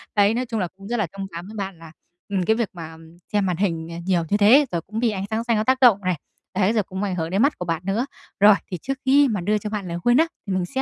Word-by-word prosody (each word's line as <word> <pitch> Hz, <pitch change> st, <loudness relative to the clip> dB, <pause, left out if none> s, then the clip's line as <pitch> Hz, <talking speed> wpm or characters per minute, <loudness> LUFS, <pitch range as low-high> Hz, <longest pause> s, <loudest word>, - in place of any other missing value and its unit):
Đấy, 205 Hz, +1 st, +4 dB
nói 250 Hz, +2 st, -1 dB
chung 225 Hz, -2 st, -3 dB
là 180 Hz, -, 0 dB
cũng 195 Hz, 0 st, -11 dB
rất 240 Hz, -, -1 dB
là 210 Hz, -5 st, 0 dB
thông 195 Hz, -, -4 dB
cảm 170 Hz, +2 st, -7 dB
với 215 Hz, -, -10 dB
bạn 195 Hz, -3 st, -4 dB
là, 165 Hz, -1 st, -12 dB, 0.4 s
ừm, 190 Hz, -2 st, 0 dB
cái 220 Hz, -, +3 dB
việc 230 Hz, -3 st, -1 dB
mà, 165 Hz, -2 st, -8 dB
ừm, 165 Hz, +1 st, -16 dB, 0.2 s
xem 205 Hz, -2 st, +2 dB
màn 180 Hz, -2 st, -1 dB
hình, 165 Hz, -4 st, -1 dB
à, 165 Hz, -, -6 dB
nhiều 180 Hz, -3 st, +2 dB
như 205 Hz, -, +2 dB
thế, 245 Hz, +8 st, +6 dB
rồi 170 Hz, -2 st, -1 dB
cũng 215 Hz, +6 st, -6 dB
bị 235 Hz, -1 st, +2 dB
ánh 195 Hz, -1 st, -3 dB
sáng 220 Hz, +1 st, -1 dB
xanh 235 Hz, -2 st, +1 dB
nó 215 Hz, -, +1 dB
tác 260 Hz, +3 st, +2 dB
động 230 Hz, -6 st, +7 dB
này, 185 Hz, -1 st, +1 dB, 0.4 s
đấy, 200 Hz, +3 st, +2 dB
rồi 215 Hz, -, +2 dB
cũng 190 Hz, +2 st, -5 dB
ảnh 190 Hz, -3 st, -1 dB
hưởng 165 Hz, -1 st, -2 dB
đến 195 Hz, +3 st, +1 dB
mắt 285 Hz, +3 st, +2 dB
của 180 Hz, -, -3 dB
bạn 165 Hz, 0 st, -2 dB
nữa. 205 Hz, +6 st, 0 dB, 0.3 s
Rồi, 205 Hz, +1 st, +8 dB, 0.2 s
thì 180 Hz, -, -2 dB
trước 270 Hz, 0 st, -3 dB
khi 280 Hz, +2 st, +5 dB
mà 210 Hz, -7 st, -1 dB
đưa 210 Hz, +4 st, +1 dB
cho 210 Hz, 0 st, -5 dB
bạn 205 Hz, -3 st, -4 dB
lời 170 Hz, 0 st, -4 dB
khuyên 240 Hz, +7 st, +3 dB
á, 325 Hz, -, +4 dB, 0.2 s
thì 195 Hz, -, -1 dB
mình 185 Hz, -1 st, 0 dB
sẽ 265 Hz, +6 st, -3 dB
200 Hz, 320 wpm, -23 LUFS, 180-225 Hz, 0.4 s, Rồi